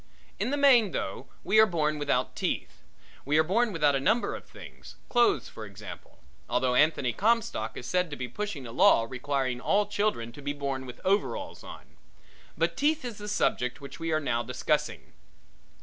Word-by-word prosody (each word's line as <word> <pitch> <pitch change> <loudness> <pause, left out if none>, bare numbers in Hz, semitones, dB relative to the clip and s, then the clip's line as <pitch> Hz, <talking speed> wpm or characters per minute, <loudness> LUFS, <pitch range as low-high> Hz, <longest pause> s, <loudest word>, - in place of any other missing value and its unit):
In - - 0
the 285 - 0
main, 250 -8 +5
though, - - -4 0.2
we 215 +3 +4
are 220 - +8
born 155 -4 0
without 145 -1 0
teeth. - - -3 0.4
We 145 +3 +1
are 155 - +5
born 220 +7 +1
without 150 -5 +2
a 135 - +1
number 220 - +1
of - - -10
things - - -13
clothes 240 -1 +3
for 110 - -9
example 105 0 -10 0.3
although 125 0 +1
Anthony 140 -3 +3
Comstock 220 - 0
is 125 - -7
said 180 +4 0
to 145 - -5
be 125 -2 -5
pushing 160 - -5
a 115 - -7
law 115 0 +5
requiring 130 0 -2
all 205 +8 +2
children 205 - -1
to 145 - -12
be 145 +1 -2
born 135 -2 -4
with 125 - -10
overalls 200 +2 -1
on; - - -12 0.6
but - - +1
teeth 300 -1 +1
is 235 -4 -6
the 210 - -7
subject 125 -10 0
which 140 +2 -10
we 165 0 -2
are 155 - +2
now 120 -6 -1
discussing. 125 +2 -2
150 Hz, 185 wpm, -28 LUFS, 125-210 Hz, 0.6 s, are